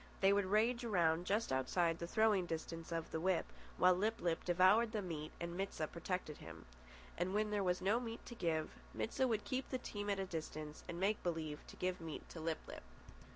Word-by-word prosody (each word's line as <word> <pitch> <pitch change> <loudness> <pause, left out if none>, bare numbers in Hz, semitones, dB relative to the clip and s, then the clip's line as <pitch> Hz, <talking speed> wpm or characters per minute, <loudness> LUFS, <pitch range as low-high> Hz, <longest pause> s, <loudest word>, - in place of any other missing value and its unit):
They 195 0 +6
would 200 -1 +2
rage 230 +5 +3
around 175 -6 +2
just 210 -2 +1
outside 165 +6 +2
the 170 - -3
throwing 210 -2 +3
distance 165 0 -4
of 165 -1 -2
the 160 - -1
whip, 185 +1 +2 0.3
while 180 0 +7
Lip 215 +5 0
lip 170 -2 0
devoured 185 +6 +5
the 215 - 0
meat 155 -4 -4
and 170 0 -4
Mit 195 +2 -2
sah 155 - 0
protected 170 -1 -3
him. 85 0 -10 0.5
And 185 +3 0
when 210 0 +1
there 205 -1 +1
was 180 -1 +1
no 210 +5 +3
meat 230 -1 -6
to - - -7
give, 165 -8 0 0.2
Mit 225 - -2
sah 260 - +3
would 220 -3 0
keep 260 0 -2
the 260 - 0
team 205 -4 -4
at 200 -1 +1
a 195 - 0
distance 155 -3 -5
and 170 - -4
make 205 +3 +2
believe 160 -4 -2
to - - -10
give 185 -1 -1
meat 160 -2 -6
to 165 - -8
Lip 160 0 -1
lip. - - -7
180 Hz, 220 wpm, -38 LUFS, 165-210 Hz, 0.5 s, while